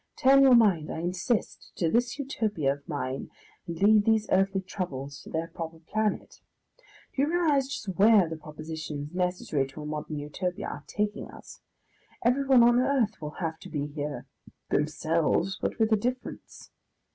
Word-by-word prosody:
Turn 270 +1 +6
your 265 -2 +7
mind, 195 -10 +4
I - - -4
insist, 180 +6 -2
to 170 - 0
this 240 +9 +1
Utopia 215 - -1
of 140 0 -15
mine, 135 -3 -3 0.4
and 165 -1 -5
leave 210 +1 +5
these 220 0 +2
earthly 195 +1 +2
troubles 140 -7 -5
to - - -12
their 160 +1 -2
proper 165 -1 -6
planet. 210 +6 -2 0.7
Do 270 - +1
you 285 - +3
realise 305 -6 +2
just 270 -6 -6
where 205 -3 +6
the 160 - -5
propositions 155 -1 -7
necessary 180 -6 -1
to 135 +3 -10
a - - -7
modern 150 0 -4
Utopia 175 +5 -4
are 145 - -7
taking 210 +3 -2
us? - - -13 0.6
Everyone 260 0 +5
on 240 +1 +5
earth 255 -7 +1
will 150 0 -6
have 160 0 -4
to - - -11
be 145 -2 -2
here; 145 0 -5 0.5
themselves, 160 +4 +1
but - - -2
with 220 -1 +2
a 220 - +5
difference. 250 +4 -5
180 Hz, 165 wpm, -28 LUFS, 155-225 Hz, 0.7 s, your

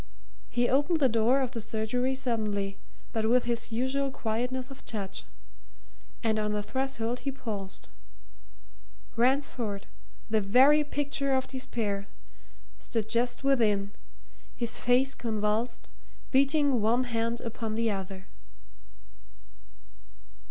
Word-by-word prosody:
He 240 0 +2
opened 290 +6 +2
the 275 - +5
door 235 +3 +3
of 255 -2 -1
the 235 -3 -3
surgery 245 +5 0
suddenly, 210 -6 -1 0.4
but 220 -1 +1
with 250 +1 +4
his 235 0 -1
usual 260 +4 0
quietness 250 +2 -2
of 270 - -11
touch. 200 -4 -5 1.0
And 220 -1 +2
on 210 0 0
the 210 0 -1
threshold 250 -1 -2
he 275 - -2
paused. 205 -7 -6 1.3
Ransford, 240 -4 +1 0.4
the 220 -1 +2
very 265 +9 +6
picture 285 -2 0
of 260 - 0
despair, 215 -6 -2 0.7
stood 220 -2 -3
just 245 +2 0
within, 215 -7 +2 0.6
his 235 -2 -1
face 255 +2 +3
convulsed, 225 +1 -1 0.4
beating 275 -2 +3
one 235 +4 +3
hand 230 -1 -1
upon 225 -1 -4
the 230 0 +1
other. 190 -1 -5
235 Hz, 115 wpm, -29 LUFS, 215-265 Hz, 1.3 s, very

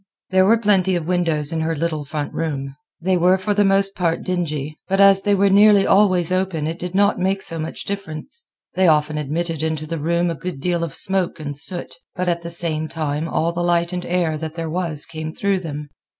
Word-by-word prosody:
There 185 0 +4
were 230 +2 +5
plenty 195 -4 +2
of 170 -3 -2
windows 165 -3 0
in 160 - -1
her 160 +1 -1
little 155 -1 -2
front 145 +1 -4
room. 140 -4 -3 0.3
They 185 +2 +1
were 180 +2 +4
for 205 +2 -1
the 205 0 +3
most 195 0 +2
part 170 -2 -1
dingy, 155 -5 -3
but 195 +1 0
as 195 -1 +7
they 205 0 +2
were 200 0 +3
nearly 205 0 +6
always 185 -4 +3
open 185 -4 -1
it 165 +2 -4
did 180 +1 -5
not 200 0 +3
make 190 +1 0
so 165 - -2
much 160 +1 -5
difference. 200 - -6 0.3
They 185 0 +3
often 150 -1 +2
admitted 160 +2 -2
into 160 -1 -2
the 165 +1 -4
room 170 +3 0
a - - -1
good 165 0 -6
deal 175 +2 -1
of 165 -4 -3
smoke 190 -3 0
and 145 -2 -5
soot; 175 +5 0 0.2
but 180 0 -2
at 170 -1 0
the 170 - -6
same 165 -2 0
time 155 -1 -3
all 165 +1 0
the 175 - -2
light 175 0 +1
and 180 0 -3
air 170 -3 0
that 160 0 -6
there 165 -2 -4
was 165 -4 -2
came 160 -1 -7
through 200 -1 0
them. 150 -4 -6
170 Hz, 220 wpm, -21 LUFS, 155-190 Hz, 0.3 s, as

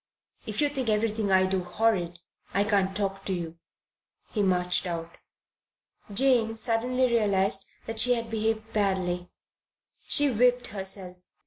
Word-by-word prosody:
"If 215 +3 -1
you 295 - +3
think 265 -5 -3
everything 215 -1 0
I 185 0 +4
do 190 -1 -1
horrid, 180 -3 -1 0.3
I 200 - +3
can't 195 -2 0
talk 195 -1 -3
to 190 - -2
you." 170 -2 -6 0.7
He 210 - -1
marched 180 -1 +1
out. 170 -1 -5 1.0
Jane 225 -1 +2
suddenly 240 +3 0
realized 200 -5 +2 0.2
that 225 0 -4
she 245 +2 +6
had 230 -1 -5
behaved 220 0 -2
badly. 185 -4 -1 0.8
She 290 -2 +4
whipped 245 +1 +2
herself. 190 -2 -1
205 Hz, 135 wpm, -27 LUFS, 190-225 Hz, 1.0 s, she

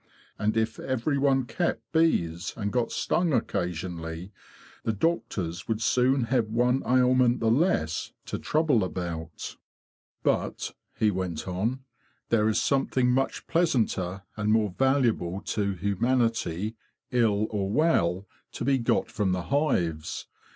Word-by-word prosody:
And 105 +1 +1
if 110 0 0
every 130 +2 -1
one 135 -2 +3
kept 115 -1 -2
bees, 90 - +1
and 105 -2 -2
got 125 -2 0
stung 170 -3 +1
occasionally, 90 -4 -3 0.5
the 110 - -1
doctors 95 - -1
would 110 -1 0
soon 125 +3 +3
have 115 -1 +1
one 125 +4 +2
ailment 125 -1 +4
the 110 -1 +2
less 120 - +1
to - - -4
trouble 150 -8 +2
about." 85 -3 -5 0.3
"" - - -56
But," - - 0 0.2
he 110 -1 +3
went 90 -4 -3
on, 110 +9 -1 0.2
" - - -40
there 110 -2 +3
is 110 - +2
something 130 -2 +2
much 135 +2 0
pleasanter 105 - 0
and 105 0 0
more 110 -4 +2
valuable 120 -9 +1
to 100 -1 -1
humanity, 110 0 0 0.3
ill 110 -4 +2
or 100 -2 -1
well, 100 - +2 0.3
to - - -4
be 135 -1 +3
got 115 - +1
from 100 -3 0
the 90 -1 -2
hives. 85 - 0
110 Hz, 135 wpm, -27 LUFS, 95-130 Hz, 0.5 s, ailment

